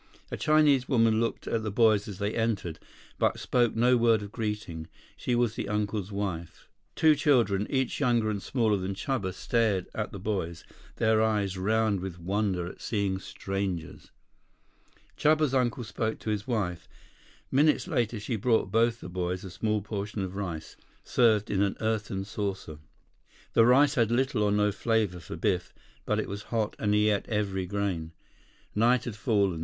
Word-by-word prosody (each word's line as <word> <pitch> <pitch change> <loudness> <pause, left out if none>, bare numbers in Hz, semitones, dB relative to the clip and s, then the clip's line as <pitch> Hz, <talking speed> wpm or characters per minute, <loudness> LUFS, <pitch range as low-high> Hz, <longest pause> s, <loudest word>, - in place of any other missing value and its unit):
A - - -2
Chinese 150 -4 +3
woman 115 -4 +3
looked 115 0 -2
at 115 - -1
the 110 - -3
boys 110 0 +3
as 100 -3 -7
they 100 +1 -2
entered, 105 -8 -1 0.4
but - - +2
spoke 120 -3 +1
no 125 +2 +4
word 115 -2 +3
of 100 - -8
greeting. 105 -8 -4 0.3
She 125 - -1
was 120 -2 +2
the 100 - -4
uncle's 105 -1 -2
wife. 95 -5 -4 0.3
Two 155 -1 +5
children, 120 -9 +2
each 130 -2 0
younger 120 -5 +2
and 100 -2 -3
smaller 110 -4 +1
than 95 +1 -3
Chuba, 100 -4 -2
stared 105 -1 0
at 110 - -3
the - - -7
boys, 90 -4 -3 0.3
their 110 0 +3
eyes 105 -3 +1
round 105 +1 +1
with 90 -1 -6
wonder 95 0 -1
at 90 - -9
seeing 100 -3 -1
strangers. 95 -4 -4 1.1
Chuba's 155 -2 +3
uncle 125 -2 +1
spoke 110 0 -2
to 110 - -4
his 105 +1 -3
wife. 100 -8 -2 0.6
Minutes 150 +3 +3
later 115 -2 0
she 105 +3 -3
brought 110 -3 +1
both 115 +2 +2
the - - -7
boys 90 0 -3
a 95 - -8
small 105 +3 -1
portion 105 -1 -4
of 95 0 -5
rice, 85 -6 -5 0.3
served 110 -4 +2
in 100 - +1
an 100 -1 0
earthen 105 -3 -2
saucer. 100 -7 -4 0.7
The 115 - +5
rice 140 +4 +5
had 115 -6 +2
little 125 -1 +1
or 105 -1 +2
no 105 0 +2
flavor 105 -4 0
for 80 - -8
Biff. 90 -1 -1 0.3
But - - +1
it - - -2
was 100 +1 -5
hot, 110 -3 -1
and 105 -1 +1
he 105 0 +4
ate 100 - -2
every 100 -4 -1
grain. 95 -5 -2 0.6
Night 120 +3 +3
had 120 -5 -5
fallen. 100 -7 +1
105 Hz, 170 wpm, -28 LUFS, 95-115 Hz, 1.1 s, Two